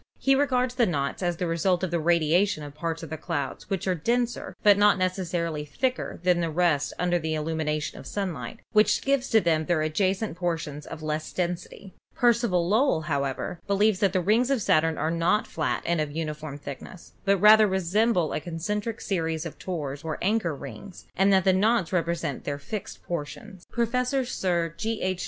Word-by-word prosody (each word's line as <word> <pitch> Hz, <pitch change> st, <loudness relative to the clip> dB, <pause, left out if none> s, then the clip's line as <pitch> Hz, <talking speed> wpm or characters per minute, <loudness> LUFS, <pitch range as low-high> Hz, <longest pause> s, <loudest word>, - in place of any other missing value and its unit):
He 270 Hz, -, +3 dB
regards 255 Hz, -3 st, +2 dB
the 250 Hz, -2 st, +2 dB
knots 140 Hz, -3 st, -2 dB
as 175 Hz, -2 st, -1 dB
the 180 Hz, -, -1 dB
result 175 Hz, +2 st, +1 dB
of 185 Hz, -, -1 dB
the 170 Hz, -, +1 dB
radiation 170 Hz, +2 st, +2 dB
of 145 Hz, -1 st, -8 dB
parts 165 Hz, +2 st, -4 dB
of 160 Hz, -, -8 dB
the 160 Hz, -, -4 dB
clouds 145 Hz, -3 st, -4 dB
which 195 Hz, -3 st, -2 dB
are 185 Hz, -, +2 dB
denser, 235 Hz, +8 st, -1 dB
but 205 Hz, -1 st, +7 dB
not 205 Hz, 0 st, +4 dB
necessarily 175 Hz, -4 st, -1 dB
thicker 255 Hz, -, -2 dB
than 180 Hz, -1 st, +3 dB
the 165 Hz, -, 0 dB
rest 155 Hz, -3 st, +1 dB
under 175 Hz, 0 st, +1 dB
the 160 Hz, -1 st, -2 dB
illumination 155 Hz, -1 st, -2 dB
of -, -, -10 dB
sunlight, 175 Hz, -, -4 dB
which 215 Hz, 0 st, +3 dB
gives 275 Hz, -1 st, +1 dB
to 225 Hz, -, +5 dB
them 160 Hz, -4 st, +1 dB
their 175 Hz, -, +2 dB
adja 185 Hz, +5 st, +1 dB
cent 195 Hz, -4 st, -5 dB
portions 160 Hz, -5 st, -3 dB
of 155 Hz, -, -8 dB
less 155 Hz, 0 st, -3 dB
density. 180 Hz, +2 st, -4 dB, 0.2 s
Percival 235 Hz, -8 st, +2 dB
Lowell, 220 Hz, -, +3 dB
however, 140 Hz, +2 st, -2 dB
believes 200 Hz, 0 st, +2 dB
that 200 Hz, -3 st, +3 dB
the 185 Hz, -1 st, +1 dB
rings 225 Hz, +7 st, +2 dB
of 275 Hz, -3 st, +2 dB
Saturn 160 Hz, -1 st, +2 dB
are 155 Hz, -, 0 dB
not 170 Hz, +6 st, +2 dB
flat 160 Hz, -, -2 dB
and 170 Hz, -2 st, +1 dB
of 150 Hz, -1 st, -3 dB
uni 155 Hz, 0 st, -3 dB
form 150 Hz, -1 st, -8 dB
thickness, 145 Hz, +5 st, -10 dB
but 200 Hz, 0 st, +3 dB
rather 215 Hz, +2 st, +7 dB
resemble 190 Hz, 0 st, +1 dB
a -, -, -1 dB
concentric 205 Hz, +8 st, -4 dB
series 165 Hz, -4 st, -2 dB
of 165 Hz, -, -8 dB
tores 145 Hz, -6 st, -4 dB
or 160 Hz, -1 st, -3 dB
anchor 195 Hz, -5 st, 0 dB
rings, 140 Hz, -, -10 dB
and 195 Hz, +1 st, +4 dB
that 190 Hz, -2 st, +4 dB
the 190 Hz, -, +4 dB
knots 195 Hz, -2 st, +2 dB
represent 170 Hz, -5 st, -1 dB
their 145 Hz, -1 st, -3 dB
fixed 195 Hz, +8 st, -7 dB
portions. 175 Hz, +4 st, -6 dB
Professor 250 Hz, +3 st, 0 dB
Sir 175 Hz, -8 st, -1 dB
G. 220 Hz, +5 st, -2 dB
H. 185 Hz, -1 st, -1 dB
175 Hz, 190 wpm, -26 LUFS, 160-205 Hz, 0.2 s, but